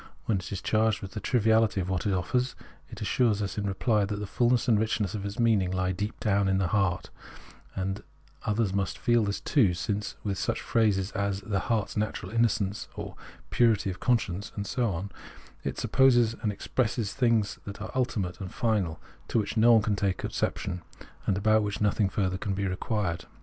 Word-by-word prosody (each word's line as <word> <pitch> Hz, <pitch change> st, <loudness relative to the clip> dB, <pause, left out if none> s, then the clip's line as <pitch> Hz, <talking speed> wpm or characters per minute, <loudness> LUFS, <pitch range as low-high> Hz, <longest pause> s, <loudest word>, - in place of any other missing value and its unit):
When 105 Hz, -4 st, +1 dB
it 90 Hz, -, -8 dB
is 95 Hz, -, -4 dB
charged 110 Hz, -1 st, +2 dB
with 95 Hz, -, -6 dB
the 105 Hz, -, -5 dB
triviahty 110 Hz, -2 st, +3 dB
of 90 Hz, -, -2 dB
what 95 Hz, 0 st, -1 dB
it -, -, +2 dB
offers, 125 Hz, +8 st, 0 dB, 0.3 s
it -, -, -10 dB
assures 115 Hz, -5 st, +2 dB
us, 100 Hz, 0 st, -2 dB
in 100 Hz, -, -2 dB
reply, 105 Hz, +2 st, +1 dB
that 100 Hz, +1 st, -2 dB
the 105 Hz, 0 st, -4 dB
fullness 120 Hz, +5 st, +2 dB
and 110 Hz, -4 st, +4 dB
richness 110 Hz, -3 st, 0 dB
of 105 Hz, -2 st, -4 dB
its 100 Hz, 0 st, -5 dB
meaning 110 Hz, -6 st, +3 dB
lie 95 Hz, 0 st, 0 dB
deep 105 Hz, +4 st, -4 dB
down 100 Hz, -2 st, +2 dB
in 95 Hz, -, +2 dB
its 95 Hz, -, +2 dB
own 105 Hz, -, +4 dB
heart, 90 Hz, -2 st, -1 dB, 0.6 s
and 95 Hz, +1 st, -2 dB
that -, -, -15 dB, 0.4 s
others 105 Hz, -3 st, 0 dB
must 100 Hz, -1 st, -1 dB
feel 120 Hz, -3 st, +3 dB
this 100 Hz, -1 st, -1 dB
too, 110 Hz, -, +3 dB
since 100 Hz, +5 st, -3 dB
with 100 Hz, -3 st, -2 dB
such -, -, -1 dB
phrases 105 Hz, -4 st, +1 dB
as 100 Hz, -2 st, -1 dB
the 100 Hz, -2 st, -1 dB
" -, -, -7 dB
heart's 110 Hz, -4 st, 0 dB
natural 105 Hz, -3 st, -2 dB
innocence," 110 Hz, -3 st, +1 dB, 0.3 s
" -, -, -18 dB
purity 110 Hz, -5 st, +3 dB
of 95 Hz, -, -8 dB
conscience," 110 Hz, -6 st, 0 dB
and 100 Hz, -, -3 dB
so 120 Hz, +1 st, 0 dB
on, 95 Hz, +3 st, -4 dB, 0.5 s
it -, -, -3 dB
supposes 120 Hz, -4 st, +4 dB
it -, -, -13 dB
has 105 Hz, -, -1 dB
expressed 110 Hz, 0 st, -1 dB
things 115 Hz, -5 st, +1 dB
that 100 Hz, 0 st, -7 dB
are 105 Hz, -, -6 dB
ultimate 105 Hz, -8 st, -1 dB
and 95 Hz, -, -5 dB
final, 100 Hz, -9 st, 0 dB, 0.3 s
to -, -, 0 dB
which 105 Hz, 0 st, 0 dB
no 115 Hz, +1 st, +6 dB
one 110 Hz, -2 st, +5 dB
can 105 Hz, -2 st, +1 dB
take 100 Hz, -2 st, -1 dB
exception, 90 Hz, -2 st, -2 dB, 0.5 s
and 95 Hz, -, +2 dB
about 110 Hz, +2 st, +4 dB
which 105 Hz, -1 st, -2 dB
nothing 105 Hz, -1 st, +2 dB
further 95 Hz, -2 st, -1 dB
can 100 Hz, 0 st, -2 dB
be 100 Hz, +1 st, -1 dB
required. 95 Hz, -1 st, -2 dB
105 Hz, 210 wpm, -28 LUFS, 95-115 Hz, 0.6 s, no